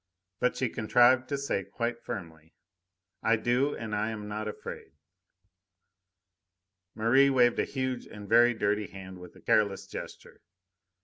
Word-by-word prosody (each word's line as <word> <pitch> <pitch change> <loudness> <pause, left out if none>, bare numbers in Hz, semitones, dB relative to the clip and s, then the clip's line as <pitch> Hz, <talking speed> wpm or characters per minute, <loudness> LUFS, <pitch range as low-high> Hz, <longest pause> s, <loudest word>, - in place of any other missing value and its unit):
But 125 - +1
she 130 - +1
contrived 120 +3 +3
to 140 - -1
say 140 -8 -2
quite 115 +3 -4
firmly: 80 -3 -8 0.7
"I 115 - +3
do, 125 +5 +1
and 110 -2 -6
I 105 +1 0
am 105 -2 -6
not 105 +1 -4
afraid." 105 - -8 2.0
Merri 130 +5 +4
waved 125 -3 +3
a - - +2
huge 130 -2 -3
and 105 -1 -10
very 120 +2 +5
dirty 105 -1 0
hand 95 -1 -10
with 90 -1 -12
a - - -16
careless 100 -2 +1
gesture. - - -9
115 Hz, 140 wpm, -29 LUFS, 105-125 Hz, 2.0 s, very